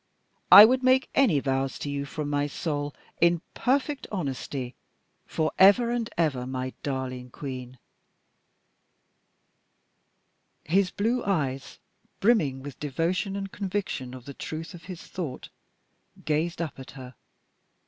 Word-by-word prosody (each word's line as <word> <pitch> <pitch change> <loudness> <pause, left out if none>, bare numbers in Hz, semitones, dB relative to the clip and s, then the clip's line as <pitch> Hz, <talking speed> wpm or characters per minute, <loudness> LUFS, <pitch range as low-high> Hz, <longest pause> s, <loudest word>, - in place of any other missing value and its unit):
I 205 - +13
would 255 +3 +2
make 260 0 +3
any 220 - +4
vows 135 -1 -1
to - - -6
you 140 0 -2
from 150 +1 -5
my 145 0 0
soul, 145 -1 -3 0.3
in 170 0 +4
perfect 275 +2 0
honesty, 135 - -4 0.5
for 155 -1 -1
ever 205 +5 +6
and 240 -1 -1
ever, 140 -7 0
my 130 0 -4
darling 130 -2 -4
Queen." 130 -1 -7 2.9
His 185 +4 +2
blue 235 +6 0
eyes, 140 -9 -2 0.4
brimming 155 - +2
with 140 -2 -9
devotion 170 +7 -1
and 195 -1 -4
conviction 190 -10 -3
of 125 -2 -11
the 140 - -8
truth 160 +6 -6
of 175 -1 -12
his 180 -2 -8
thought, 160 -8 -6 0.8
gazed 160 +3 0
up 155 -4 -7
at 130 - -10
her. 130 -1 -9
155 Hz, 130 wpm, -27 LUFS, 135-195 Hz, 2.9 s, I